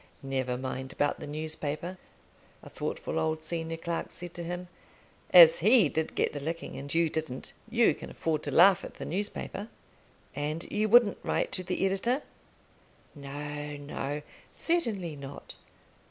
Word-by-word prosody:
"Never 130 -2 -1
mind 130 0 -4
about 145 0 0
the - - -7
newspaper," 155 +3 -4 0.6
a - - -11
thoughtful - - -3
old 155 0 -1
senior 165 0 -3
clerk 170 0 -3
said 175 -1 -6
to 175 - -4
him. 175 +1 -5 0.6
"As - - +9
he 220 - +6
did 160 +1 -2
get - - +1
the 145 - -4
licking 165 +4 -4
and 140 +1 -6
you 165 0 +3
didn't, 155 -5 -4 0.2
you 230 -6 +4
can - - -9
afford 155 -2 -1
to - - -3
laugh 185 +2 +6
at - - -8
the - - -6
newspaper." 200 +2 -3 0.7
"And 150 +3 -2
you 215 +1 +1
wouldn't 235 -2 +6
write - - 0
to 185 - -2
the 180 +1 0
editor?" 215 +8 +1 0.9
"No, 145 +1 -6
no; 145 0 -4 0.3
certainly 215 - 0
not. 140 0 -9
160 Hz, 155 wpm, -29 LUFS, 145-190 Hz, 0.9 s, As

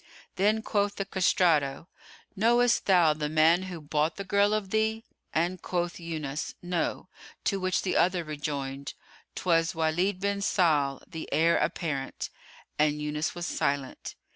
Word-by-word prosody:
Then 215 +3 +2
quoth 205 -2 0
the 195 - -3
castrato, 170 -7 +2 0.5
"Knowest 235 +3 +3
thou 175 -5 +5
the 150 -1 -3
man 160 +3 +4
who 175 -2 -6
bought 150 +1 0
the 200 - -5
girl 200 +2 +2
of 210 -3 -1
thee?"; 220 +1 +1 0.3
and 175 +3 0
quoth 175 -1 -2
Yunus, 155 -4 -4
"No," 175 -1 -2 0.4
to 195 - 0
which 185 0 0
the 190 - -1
other 180 -1 +2
rejoined, 140 -3 -4 0.4
"'Twas 165 -2 +1
Walid 175 +5 +1
bin 200 +1 -1
Sahl,[FN#112] 150 -9 +1
the 160 -2 -6
Heir 165 +2 +3
Apparent." 150 -4 -2 0.5
And 150 0 +2
Yunus 150 +2 -2
was 175 0 -4
silent. 140 -5 -2
170 Hz, 140 wpm, -28 LUFS, 150-195 Hz, 0.5 s, thou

